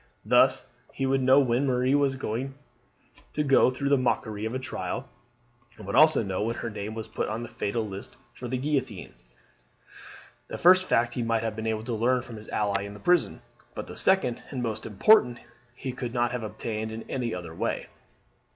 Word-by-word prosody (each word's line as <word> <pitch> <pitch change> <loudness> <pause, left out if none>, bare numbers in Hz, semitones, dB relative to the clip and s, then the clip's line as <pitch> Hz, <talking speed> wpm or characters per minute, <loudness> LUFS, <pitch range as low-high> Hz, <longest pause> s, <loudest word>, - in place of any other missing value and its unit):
Thus - - +4 0.3
he 135 - -2
would 135 0 +2
know 130 +2 +6
when 130 0 +2
Marie 130 +1 +2
was 140 -2 +2
to 120 0 -7
go 135 -3 +5
through 135 +2 -2
the 140 -1 +4
mockery 110 -4 -1
of 110 +3 -3
a - - +1
trial, 130 -1 -4 0.7
and 105 - -10
would 100 - -3
also 155 -3 +6
know 95 -2 -2
when 115 +2 -1
her 115 - -4
name 105 +1 -5
was 110 -1 -5
put - - -3
on 110 +2 -3
the - - -6
fatal 110 +2 -2
list 100 0 -9 0.2
for 125 - -7
the 130 +2 -2
guillotine. 130 -7 -2 1.3
The - - -6
first 185 +1 +6
fact 120 -5 +2
he 125 - -2
might 115 -1 0
have 110 -1 -2
been 110 0 -4
able 110 -1 -1
to 120 +1 -3
learn 120 +3 +1
from 115 -3 -9
his 105 - -11
ally 100 -1 0
in 100 0 -7
the - - -11
prison, 175 - +1 0.3
but - - -5
the - - -10
second 185 -11 +2
and 130 -3 -4
most 110 -2 -3
important 120 - +4 0.4
he 130 - -5
could 125 -1 -5
not 120 0 +1
have 125 -1 -3
obtained 110 0 -4
in 110 +1 -6
any 125 -3 -2
other 85 -3 -7
way. - - -2
120 Hz, 200 wpm, -27 LUFS, 110-130 Hz, 1.3 s, know